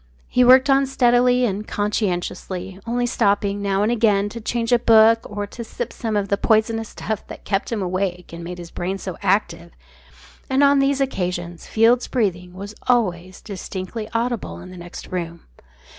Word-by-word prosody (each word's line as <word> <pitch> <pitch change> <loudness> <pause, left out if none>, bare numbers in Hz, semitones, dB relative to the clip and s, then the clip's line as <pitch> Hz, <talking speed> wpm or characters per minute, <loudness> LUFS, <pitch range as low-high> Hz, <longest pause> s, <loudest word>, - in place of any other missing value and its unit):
He 250 - +3
worked 260 +2 +7
on 275 0 +4
steadily 250 -1 +3
and 210 -1 -3
conscientiously, 190 -2 -2
only 245 +1 0
stopping 205 -4 +1
now 200 0 +1
and 215 - +2
again 210 -3 +2
to 230 +2 -8
change 230 +1 -2
a 245 - +5
book, 225 -1 +6
or 205 0 -3
to 235 +4 -8
sip 220 - -6
some 225 -2 -3
of 200 -1 -1
the 200 - +1
poisonous 225 +1 +1
stuff 220 -1 -5
that - - -10
kept 195 +3 -1
him 215 -4 -1
awake 180 -1 -3
and 170 0 -7
made 180 +1 -6
his 175 -1 -9
brain 185 +2 -3
so 185 -2 -6
active, 195 - 0 0.8
and 265 +1 +3
on 280 0 +5
these 275 0 +2
occasions 175 -8 -3
Field's 230 +3 +3
breathing 180 -7 -1
was 200 +2 -7
always 185 -7 0
distinctly 200 +1 -6
audible 235 -1 -2
in 185 - -11
the 175 -1 -10 0.2
room. 170 -2 -4
205 Hz, 175 wpm, -21 LUFS, 185-235 Hz, 0.8 s, worked